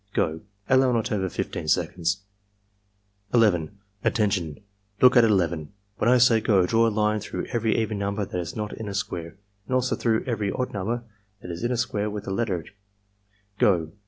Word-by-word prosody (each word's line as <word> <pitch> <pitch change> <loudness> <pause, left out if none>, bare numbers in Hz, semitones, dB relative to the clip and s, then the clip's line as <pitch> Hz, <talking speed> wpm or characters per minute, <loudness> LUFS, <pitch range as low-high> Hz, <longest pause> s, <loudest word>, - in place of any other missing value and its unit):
— - - -37
Go!" 80 0 0 0.3
(Allow 130 -1 +4
not 115 -2 0
over 95 -3 0
15 85 -1 -4
seconds.) 90 +3 0 1.1
11. 100 -5 +3 0.3
"Attention! 100 - 0 0.4
Look 125 -1 +6
at 120 - +7
11. 85 -7 +1 0.2
When 115 - +2
I 125 - +6
say 120 -2 +5
'go' 100 -4 +3
draw 115 +4 +3
a - - +3
line 105 0 +1
through 105 - -5
every 115 -2 +1
even 110 -2 -1
number 100 +1 -1
that 90 - -4
is 85 - -6
not 105 -1 -4
in 110 - -6
a 100 - -5
square, 85 -2 -4 0.3
and 130 - 0
also 130 0 +1
through 115 -2 +1
every 110 -5 -1
odd 125 - -3
number 110 +5 -2 0.4
that 90 - -6
is 85 +5 -6
in 120 - 0
a 125 - 0
square 105 -3 -1
with 105 -1 -6
a - - -4
letter. 95 -5 -1 0.5
— 100 0 -40
Go!" 85 -5 +3
105 Hz, 190 wpm, -25 LUFS, 90-115 Hz, 1.1 s, at